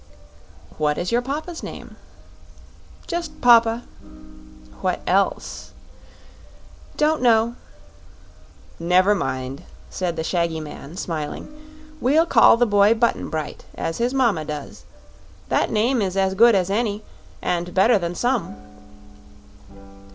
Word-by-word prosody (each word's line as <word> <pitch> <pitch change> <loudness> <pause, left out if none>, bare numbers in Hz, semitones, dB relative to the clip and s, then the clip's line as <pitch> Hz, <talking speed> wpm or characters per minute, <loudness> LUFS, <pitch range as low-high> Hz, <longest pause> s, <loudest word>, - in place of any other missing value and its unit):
"What 150 -1 +1
is 175 - -2
your 240 +1 +2
papa's 310 +6 -5
name?" - - -9 1.1
"Just 345 0 -5
Papa." 235 -1 +5 1.0
"What - - -1
else?" 195 +2 -1 1.2
"Don't 305 0 +2
know." 230 -1 +3 1.3
"Never 180 +4 +3
mind," 135 -6 -3 0.3
said 180 -2 -2
the 160 - -3
shaggy 170 -1 -1
man, 155 +1 -9
smiling. 155 -5 -5 0.5
"We'll 300 +6 +3
call 230 -6 +6
the 245 - +3
boy 205 0 +4
Button 235 +1 0
Bright, 155 -2 -5
as 165 - -4
his 240 +1 +1
mama 235 -12 +1
does. 150 -1 -8 0.6
That - - +1
name 230 +3 +1
is 190 -1 -2
as 190 0 +1
good 230 +3 +5
as 190 0 0
any, 210 -1 -1 0.4
and 175 0 -2
better 205 +4 +4
than 170 -1 -4
some." 245 - -1
200 Hz, 115 wpm, -22 LUFS, 170-240 Hz, 1.3 s, call